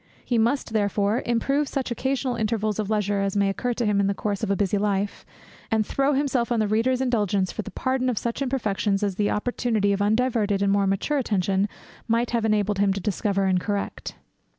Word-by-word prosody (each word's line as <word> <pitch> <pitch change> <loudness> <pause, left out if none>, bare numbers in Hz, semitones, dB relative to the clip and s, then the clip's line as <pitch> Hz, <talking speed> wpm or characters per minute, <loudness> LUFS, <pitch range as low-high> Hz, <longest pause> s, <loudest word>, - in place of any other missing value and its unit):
He 240 -2 +1
must, 235 +1 0
therefore, 205 +1 +1
improve 275 +5 +1
such 265 -2 -3
occasional 260 0 -1
intervals 215 -1 -1
of 210 -1 -2
leisure 205 -2 0
as 195 0 -1
may 200 -1 +3
occur 240 +5 -2
to 240 - -1
him 205 -1 +2
in 200 - +2
the 200 - 0
course 205 0 -2
of 220 - -2
a 200 - +2
busy 200 +1 0
life, 200 -1 -1 0.4
and 220 -2 +1
throw 275 +5 +1
himself 265 -4 0
on 235 - +2
the 215 - +2
Reader's 240 +5 +1
indulgence 205 -7 +1
for - - -4
the - - -8
pardon 260 0 -1
of 240 - -2
such 235 +5 -2
imperfections, 215 -6 0
as 200 -1 0
the 205 -1 +1
opportunity 215 -2 0
of 200 - -1
undiverted 215 -2 +1
and 200 - +2
more 200 0 +2
mature 195 +10 0
attention 200 -3 0 0.4
might 230 +1 +1
have 230 -2 0
enabled 210 -2 +1
him 200 -1 +3
to 200 - -3
discover 195 0 0
and 185 -1 +2
correct. 205 0 -3
215 Hz, 210 wpm, -24 LUFS, 200-240 Hz, 0.4 s, may